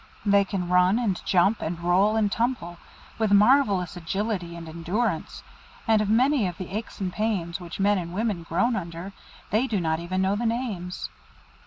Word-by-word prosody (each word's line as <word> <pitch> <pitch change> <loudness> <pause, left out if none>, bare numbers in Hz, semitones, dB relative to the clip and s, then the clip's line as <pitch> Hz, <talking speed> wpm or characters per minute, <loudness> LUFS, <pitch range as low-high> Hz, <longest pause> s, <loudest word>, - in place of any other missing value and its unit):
They 200 -1 +5
can 185 -2 -3
run 180 +3 +4
and 215 -7 -1
jump, 195 +4 +3
and 165 +1 -3
roll 185 +5 +3
and 210 -2 +1
tumble, 225 -8 -2 0.4
with 220 -2 +1
marvellous 205 - +4
agility 180 0 -3
and 170 -1 -8
endurance, 170 +3 -2 0.4
and 220 -1 +4
of 210 - -1
many 250 0 +3
of 175 -2 -6
the 185 +1 -6
aches 220 +1 -5
and 185 -2 -3
pains 195 -6 -1
which 175 0 -8
men 200 0 +3
and 170 -1 -6
women 205 -1 -1
groan 190 +9 0
under, 170 0 -6 0.4
they 225 +5 +2
do 215 -6 0
not 160 -2 0
even 180 +2 -3
know 195 +1 +1
the 230 +3 -1
names. 220 -7 -3
195 Hz, 180 wpm, -25 LUFS, 175-220 Hz, 0.4 s, They